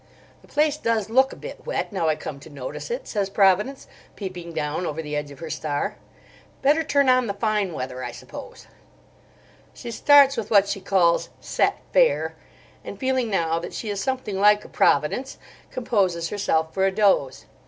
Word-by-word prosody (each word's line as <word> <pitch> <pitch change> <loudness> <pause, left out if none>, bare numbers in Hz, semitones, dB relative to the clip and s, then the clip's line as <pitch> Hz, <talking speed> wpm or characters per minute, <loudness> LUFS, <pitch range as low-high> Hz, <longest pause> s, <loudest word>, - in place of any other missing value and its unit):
"The - - -20
place 300 0 +1
does 225 -6 -1
look 265 +3 +4
a - - -8
bit - - -9
wet, - - -3
now 165 -5 +1
I 155 - +2
come 145 -2 -7
to 140 - -13
notice 140 - -7
it," 485 +1 -4
says 200 -3 -1
Providence, 200 +7 +2 0.3
peeping 180 -4 -7
down 155 +2 -2
over 155 - -4
the 150 -2 -4
edge 150 0 -3
of 140 - -12
her 165 -2 -7
star. 145 -2 -2 0.7
"Better 295 +4 +4
turn 280 -2 +2
on 255 -1 +4
the 200 - -3
fine 210 -3 0
weather, 130 -3 -5
I - - -4
suppose." - - -11 1.1
She 240 - -7
starts 280 +3 +6
with 225 0 -4 0.2
she 195 - -3
calls 175 -4 +2
"set - - 0
fair," - - +3 0.5
and - - -8
feeling 260 -3 0
now 165 -4 0
that 170 - -7
she 215 - -4
is 200 -1 -3
something 250 -6 -2
like 210 +1 +4
a - - -12
Providence, 150 - +1 0.3
composes 190 -9 0
herself 160 -6 0
for 190 0 +2
a - - +1
doze. 190 -10 +1
200 Hz, 180 wpm, -24 LUFS, 160-250 Hz, 1.1 s, starts